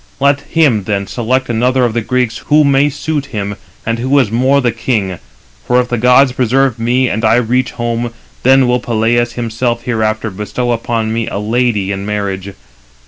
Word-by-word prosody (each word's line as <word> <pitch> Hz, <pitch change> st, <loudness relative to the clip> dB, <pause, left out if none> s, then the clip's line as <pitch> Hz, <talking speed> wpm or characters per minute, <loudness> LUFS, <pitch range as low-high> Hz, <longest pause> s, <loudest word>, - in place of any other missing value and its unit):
Let 140 Hz, 0 st, +2 dB
him 135 Hz, -, +1 dB
then 100 Hz, -1 st, -1 dB
select 130 Hz, +4 st, -1 dB
another 125 Hz, +2 st, +1 dB
of 115 Hz, -, -1 dB
the 120 Hz, -, 0 dB
Greeks 125 Hz, 0 st, -1 dB
who 150 Hz, +1 st, +5 dB
may 140 Hz, 0 st, +3 dB
suit 145 Hz, 0 st, -3 dB
him, 100 Hz, -3 st, -4 dB, 0.3 s
and 115 Hz, +1 st, -1 dB
who 130 Hz, +4 st, +1 dB
is 125 Hz, -7 st, +2 dB
more 130 Hz, +4 st, +3 dB
the 125 Hz, -3 st, +1 dB
king; 105 Hz, -6 st, -2 dB, 0.5 s
for 125 Hz, 0 st, +3 dB
if 125 Hz, 0 st, -1 dB
the 120 Hz, -, -1 dB
gods 125 Hz, +3 st, +5 dB
preserve 130 Hz, 0 st, +1 dB
me, 125 Hz, +3 st, +1 dB
and 110 Hz, 0 st, -2 dB
I 110 Hz, +1 st, +4 dB
reach 125 Hz, +2 st, 0 dB
home, 120 Hz, 0 st, -2 dB, 0.3 s
then 130 Hz, 0 st, +4 dB
will 125 Hz, 0 st, +2 dB
Peleus 120 Hz, +1 st, 0 dB
himself 120 Hz, 0 st, -2 dB
hereafter 110 Hz, -2 st, -1 dB
bestow 105 Hz, +5 st, -3 dB
upon 115 Hz, -1 st, -1 dB
me 115 Hz, -1 st, -2 dB
a -, -, -4 dB
lady 105 Hz, -2 st, 0 dB
in 100 Hz, 0 st, -3 dB
marriage. 100 Hz, -2 st, -3 dB
120 Hz, 185 wpm, -14 LUFS, 110-130 Hz, 0.5 s, who